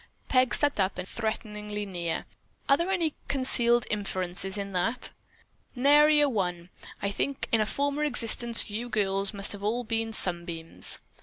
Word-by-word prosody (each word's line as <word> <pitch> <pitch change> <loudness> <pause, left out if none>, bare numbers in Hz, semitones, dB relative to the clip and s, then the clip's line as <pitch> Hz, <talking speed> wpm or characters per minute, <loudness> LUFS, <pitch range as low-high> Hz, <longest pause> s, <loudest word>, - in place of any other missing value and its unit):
Peg 255 -1 +3
stepped 290 -6 +1
up 190 0 +1
threateningly 210 -1 -5
near. 175 -4 -4 0.4
"Are 275 - +6
there 340 +5 -2
any 340 -5 0
concealed 240 -3 +2
inferences 190 -1 -2
in 200 -1 -5
that?" 195 +7 -1 0.6
"Nary 295 +4 +5
a 290 - +4
one. 180 -7 -3 0.3
I 200 - 0
think 275 +6 -3
in 225 - +3
a 215 - 0
former 285 +3 -1
existence 235 -4 +3
you 235 +4 -4
girls 195 -2 +2
must 200 -2 -4
have 205 - -7
all 225 +4 -1
been 225 0 -2
sunbeams." 170 -5 +1
220 Hz, 150 wpm, -27 LUFS, 195-255 Hz, 0.6 s, Are